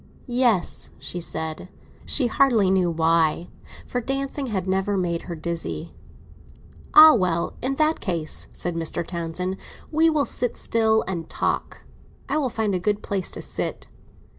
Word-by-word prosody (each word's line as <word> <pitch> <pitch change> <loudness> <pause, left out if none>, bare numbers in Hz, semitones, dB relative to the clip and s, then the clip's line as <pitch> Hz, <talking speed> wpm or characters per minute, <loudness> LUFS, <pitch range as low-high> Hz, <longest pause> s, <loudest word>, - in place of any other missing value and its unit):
"Yes," 240 -7 +1
she 175 - -5
said; 160 +2 -5 0.4
she 275 - +3
hardly 230 -5 +3
knew 185 -2 +2
why, 165 0 +1 0.4
for 245 - -3
dancing 275 +2 -3
had 190 -5 -2
never 195 +2 0
made 170 -2 -1
her 170 - -3
dizzy. 165 0 -4 1.0
"Ah, 310 0 +11
well, 175 -5 0
in 265 +2 -1
that 310 +2 +2
case," 165 -5 -1
said 175 - -3
Mr. 165 0 -1
Townsend, 175 +2 -3 0.3
"we 320 +1 +4
will 300 -3 +1
sit 245 - -1
still 220 -1 +2
and 170 -4 -4
talk. - - -2 0.4
I 290 +3 0
will 270 -4 0
find 220 -3 -1
a 185 - 0
good 205 +3 -1
place 195 -3 -1
to - - -6
sit." - - -4
190 Hz, 150 wpm, -24 LUFS, 170-245 Hz, 1.0 s, Ah